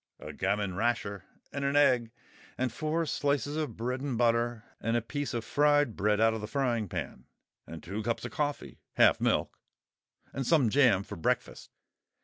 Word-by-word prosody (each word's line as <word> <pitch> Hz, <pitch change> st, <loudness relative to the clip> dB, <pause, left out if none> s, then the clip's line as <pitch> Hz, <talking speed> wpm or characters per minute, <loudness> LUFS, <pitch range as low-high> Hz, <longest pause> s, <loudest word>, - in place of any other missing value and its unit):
A -, -, -8 dB
gammon 100 Hz, -2 st, -1 dB
rasher 100 Hz, -2 st, -1 dB, 0.3 s
and 140 Hz, -, -3 dB
an 140 Hz, +1 st, 0 dB
egg 125 Hz, -5 st, +4 dB, 0.5 s
and 125 Hz, -2 st, -1 dB
four 155 Hz, +4 st, -1 dB
slices 145 Hz, 0 st, -1 dB
of 150 Hz, -8 st, -3 dB
bread 125 Hz, +3 st, -2 dB
and 135 Hz, -4 st, -2 dB
butter 120 Hz, -1 st, +1 dB, 0.2 s
and 115 Hz, +1 st, 0 dB
a -, -, 0 dB
piece 140 Hz, +3 st, -3 dB
of 115 Hz, -1 st, -3 dB
fried 145 Hz, -5 st, +3 dB
bread 105 Hz, +1 st, +1 dB
out 115 Hz, 0 st, +4 dB
of 110 Hz, -, -4 dB
the 105 Hz, -, -5 dB
frying 120 Hz, -4 st, -1 dB
pan -, -, -5 dB, 0.4 s
and 80 Hz, -1 st, -9 dB
two 100 Hz, +5 st, -4 dB
cups 115 Hz, +2 st, -2 dB
of 120 Hz, -, -5 dB
coffee—half 145 Hz, +2 st, 0 dB
milk—and 135 Hz, -3 st, -4 dB
some 140 Hz, -10 st, +4 dB
jam 120 Hz, -8 st, +4 dB
for -, -, -8 dB
breakfast. 80 Hz, -, -2 dB
120 Hz, 165 wpm, -30 LUFS, 110-140 Hz, 0.5 s, egg